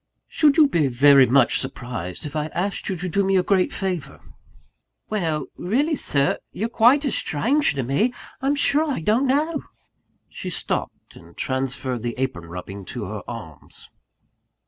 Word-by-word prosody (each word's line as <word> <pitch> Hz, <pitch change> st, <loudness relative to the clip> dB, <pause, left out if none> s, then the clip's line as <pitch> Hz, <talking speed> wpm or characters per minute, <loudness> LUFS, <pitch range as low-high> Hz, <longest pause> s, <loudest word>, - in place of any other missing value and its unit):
"Should 295 Hz, -3 st, +3 dB
you 310 Hz, -2 st, +7 dB
be 165 Hz, -, +1 dB
very 135 Hz, +1 st, +6 dB
much 125 Hz, 0 st, +4 dB
surprised 120 Hz, -, -5 dB
if 150 Hz, -, -6 dB
I 150 Hz, 0 st, -1 dB
asked 195 Hz, +3 st, -2 dB
you 190 Hz, -, -1 dB
to 180 Hz, +1 st, -4 dB
do 200 Hz, +3 st, +1 dB
me 195 Hz, 0 st, +2 dB
a 180 Hz, -, +3 dB
great 190 Hz, -1 st, +2 dB
favour?" 185 Hz, -6 st, -4 dB, 0.9 s
"Well 160 Hz, -8 st, -1 dB
really, 275 Hz, -, +1 dB
Sir 140 Hz, -, +1 dB
you're 225 Hz, +4 st, -3 dB
quite 245 Hz, +6 st, +4 dB
a 275 Hz, -, 0 dB
stranger 245 Hz, -, +1 dB
to 135 Hz, -, -1 dB
me 140 Hz, -, +1 dB, 0.3 s
I'm 275 Hz, +2 st, +1 dB
sure 290 Hz, +2 st, +2 dB
I 260 Hz, -, -2 dB
don't 225 Hz, -, +2 dB
know!" 300 Hz, +4 st, +1 dB, 0.7 s
She -, -, -6 dB
stopped, -, -, -4 dB
and -, -, -16 dB
transferred 130 Hz, -2 st, -2 dB
the 120 Hz, 0 st, -3 dB
apron 110 Hz, -11 st, -3 dB
rubbing 90 Hz, +3 st, -8 dB
to 115 Hz, +1 st, -5 dB
her 105 Hz, +2 st, -5 dB
arms. 105 Hz, -11 st, -8 dB
165 Hz, 165 wpm, -23 LUFS, -, 0.9 s, you